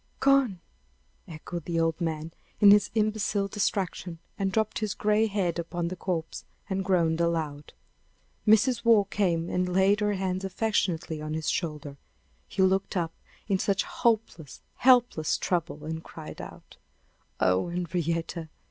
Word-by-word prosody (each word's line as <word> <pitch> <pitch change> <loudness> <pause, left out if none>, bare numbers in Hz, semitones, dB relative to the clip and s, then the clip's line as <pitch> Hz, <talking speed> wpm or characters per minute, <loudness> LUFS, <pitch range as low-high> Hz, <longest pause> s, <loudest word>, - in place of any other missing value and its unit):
gone!" 275 -9 +3 0.7
echoed 170 +1 -7
the 170 -1 -1
old 165 +1 0
man, 160 -1 -2 0.3
in 205 -1 +8
his 205 0 +5
imbecile 215 -2 +1
distraction, 190 -3 -2 0.2
and 195 -1 -1
dropped 220 +2 0
his 215 -2 -2
gray 215 +1 +2
head 190 -5 -1
upon 170 0 -3
the 185 - -5
corpse, 170 -3 -4 0.2
and 195 -1 -1
groaned 170 -3 +2
aloud. 160 -4 -2 0.8
Mrs. 225 +4 +4
Waugh 230 -3 +6
came 180 -4 0
and 180 0 -1
laid 190 +3 +3
her 210 0 +1
hand 190 -1 -2
affectionately 180 -5 -1
on 155 0 -4
his 160 -1 -1
shoulder. 150 -4 -4 0.5
He 190 - 0
looked 190 +1 +1
up 165 -2 -1 0.3
in 195 -3 +1
such 200 -2 +1
hopeless, 230 - -1 0.2
helpless 245 - +4
trouble, 165 -4 -2
and 160 +1 -5
cried 155 -2 -9
out: - - -12 0.6
"Oh, 95 - +2
Henrietta! 170 -1 -2
180 Hz, 140 wpm, -27 LUFS, 165-205 Hz, 0.8 s, in